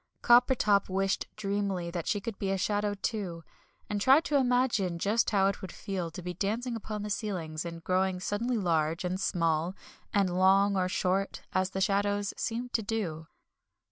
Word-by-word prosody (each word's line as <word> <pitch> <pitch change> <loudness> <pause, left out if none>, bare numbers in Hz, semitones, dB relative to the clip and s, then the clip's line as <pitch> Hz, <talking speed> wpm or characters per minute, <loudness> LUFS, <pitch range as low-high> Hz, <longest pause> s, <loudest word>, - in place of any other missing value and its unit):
Coppertop 240 -5 +4
wished 195 +1 0
dreamily 200 -4 -2
that 170 -2 -4
she 205 - +1
could 200 0 -6
be 195 - -1
a 195 - +1
shadow 205 +1 0
too, 195 -5 -3 0.4
and 205 -1 -2
tried 270 +7 +6
to 295 - -1
imagine 245 -9 +2
just 210 +6 +1
how 195 -3 +3
it 195 0 0
would 190 - -6
feel 190 -5 -4
to 170 +2 -9
be 180 0 -4
dancing 225 +7 -2
upon 215 -2 -5
the 210 - -4
ceilings, 175 -7 -3
and 165 -1 -7
growing 185 +1 +1
suddenly 230 +6 -1
large 165 -3 0
and 180 +1 -2
small, 170 0 0 0.4
and 195 -3 +1
long 195 +2 +4
or 185 -1 +1
short, 190 +1 -1
as 185 0 +1
the 190 0 -3
shadows 205 +1 +1
seemed 240 +2 -3
to 225 - +2
do. 190 -8 -3
195 Hz, 175 wpm, -29 LUFS, 180-210 Hz, 0.4 s, tried